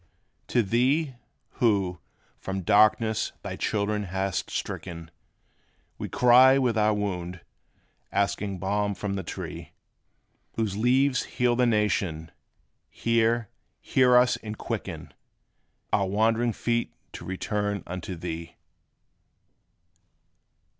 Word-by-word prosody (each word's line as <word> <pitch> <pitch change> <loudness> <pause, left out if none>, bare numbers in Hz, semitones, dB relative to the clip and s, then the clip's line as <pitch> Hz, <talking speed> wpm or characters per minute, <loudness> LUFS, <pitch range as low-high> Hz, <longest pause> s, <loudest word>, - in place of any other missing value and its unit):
To 120 - +2
Thee, 130 +8 +1 0.5
who, 100 -7 +2 0.4
from 95 0 -4
darkness, 110 +3 +3
thy - - -5
children 105 0 -1
hast 95 0 -2
stricken, 85 -1 -5 0.9
We - - -4
cry 125 +2 +6
with 125 -4 +1
our 105 -1 +3
wound, 90 -4 -3 0.7
asking 100 -1 -1
balm 100 +2 -1
from 100 0 -3
the 95 - -2
Tree, 85 - -7 0.8
Whose 110 -4 -2
leaves 125 +4 +2
heal 125 -1 +1
the 125 0 +3
nations: 95 -8 0 0.6
Hear, 115 -1 +1 0.3
hear 125 -1 +4
us, 125 0 +4
and 105 -1 -7
quicken - - -5 0.8
Our 100 -1 +2
wandering 115 +4 +1
feet 120 +1 -1 0.2
to - - -8
return 100 +1 -2
unto 90 +1 -5
Thee! 85 -1 -6
105 Hz, 105 wpm, -26 LUFS, 95-120 Hz, 0.9 s, cry